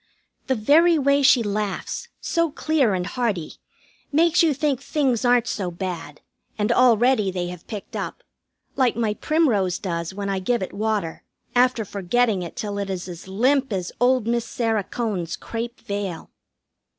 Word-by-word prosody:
The 260 - +2
very 320 +9 +5
way 280 0 +3
she 260 -3 +5
laughs 205 -1 -3
so 335 -1 0
clear 290 -8 +1
and 180 -1 -2
hearty 200 -7 -2 0.5
makes 335 +3 +4
you 330 -2 +4
think 285 -2 0
things 265 -6 0
aren't 245 -1 +4
so 195 -6 -2
bad, 170 -4 -6 0.4
and 210 -1 +1
already 240 -3 +4
they 180 -1 -3
have 180 -1 -10
picked 210 -3 -7
up. - - -5 0.5
Like 255 -4 +2
my 225 -2 0
primrose 215 - +1
does 170 -3 -3
when 200 +1 -5
I 195 -1 -1
give 225 +3 0
it - - -6
water, 210 -5 -2 0.3
after 245 -2 +3
forgetting 200 +2 +1
it 170 - -7
till 205 -4 -4
it 200 -1 -3
is 185 -1 -4
as 175 0 -9
limp 255 +7 +2
as 185 -3 -2
old 250 -2 +3
Miss 235 0 0
Sarah 225 -3 -1
Cone's 205 -9 -3
crêpe 235 +1 -5
veil. 200 -4 -5
220 Hz, 160 wpm, -23 LUFS, 190-255 Hz, 0.5 s, very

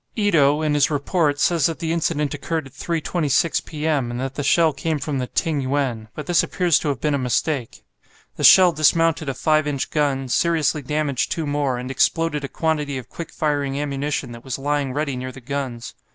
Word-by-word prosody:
Ito, 155 -8 +3
in 150 -1 +1
his 145 -1 +3
report, 145 0 0
says 165 -3 +3
that 165 - -4
the 165 -1 -3
incident 150 -3 -1
occurred 155 +1 -3
at 135 - -14
3.26 165 -2 0
p.m., 150 -5 -1
and 120 0 -4
that 135 0 -3
the 145 - -4
shell 160 +2 +3
came 155 +3 -2
from 145 -1 -3
the 125 - -2
"Ting 155 0 -1
yuen," 130 -5 -1
but 150 - -6
this 175 0 +3
appears 175 -5 +1
to - - -4
have 140 -3 -1
been 150 +1 0
a 140 - 0
mistake. 125 0 -2 0.5
The - - -5
shell 185 -2 +8
dismounted 160 -1 +2
a 135 - -3
5 155 +1 +2
inch 140 -2 -2
gun, 140 -3 0
seriously 160 +2 +1
damaged 145 -1 -1
two 165 - -2
more, 145 -3 -1
and 125 +1 -5
exploded 150 +2 +1
a - - -2
quantity 150 -3 -1
of 125 -4 -8
quick 165 -1 -8
firing 145 -2 -1
ammunition 140 -2 -3
that 115 0 -10
was 130 -2 -4
lying 145 -1 -1
ready 145 0 -2
near 130 +1 -5
the 135 - -11
guns. 130 -2 -5
145 Hz, 205 wpm, -22 LUFS, 135-160 Hz, 0.5 s, shell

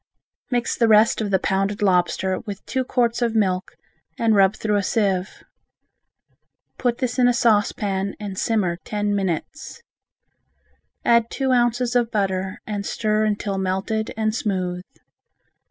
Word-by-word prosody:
Mix 245 -2 0
the 230 - +2
rest 220 +1 +4
of 210 - -2
the 195 - +3
pounded 195 +2 -1
lobster 185 0 +1
with 205 -2 -8
two 260 0 -1
quarts 245 -2 0
of 230 -2 0
milk 185 -4 0 0.4
and 230 -1 +2
rub 195 0 +4
through 210 -1 0
a - - +1
sieve. 195 -2 -1 1.4
Put 245 -2 0
this 255 -1 -2
in 245 - +5
a 245 - +3
saucepan 205 -3 +1
and 205 -2 -6
simmer 190 -5 0
ten 205 +2 -2
minutes. 200 - -4 1.2
Add 235 -1 +4
two 265 -2 -1
ounces 245 0 +1
of 240 -2 +2
butter 190 -3 -1
and 205 -2 -4
stir 215 +1 0
until 205 -2 -1
melted 190 +4 -2
and 215 -1 0
smooth. 185 -5 -2
210 Hz, 140 wpm, -22 LUFS, 190-235 Hz, 1.4 s, in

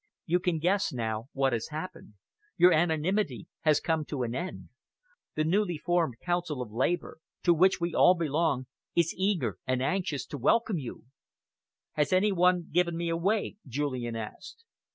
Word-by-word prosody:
You 175 +2 +2
can 175 -2 0
guess 185 +5 +1
now 115 0 -3
what 135 -2 +1
has 115 -1 -2
happened. 155 - -7 0.4
Your 180 0 +7
anonymity 160 - +1
has 155 -2 +3
come 160 -2 0
to 140 -4 -3
an 115 -1 -3
end. 175 +8 -5 0.7
The 155 - +1
newly 175 +1 +1
formed 165 -6 0
Council 175 -5 -2
of 120 -4 -5
Labour, 135 +10 -1 0.2
to 175 - +5
which 185 +4 +4
we 170 -1 -2
all 180 - +6
belong, 155 -4 0 0.3
is 170 -1 +2
eager 180 - 0
and 130 0 +1
anxious 150 +1 -1
to 145 - -7
welcome 210 - +2
you." 130 -4 -7 0.9
"Has 150 -1 0
any 190 +3 +4
one 180 -1 +3
given 170 0 +1
me 170 0 -2
away?" 195 +6 0
Julian 130 -3 -2
asked. 440 - -8
165 Hz, 160 wpm, -29 LUFS, 135-180 Hz, 0.9 s, Your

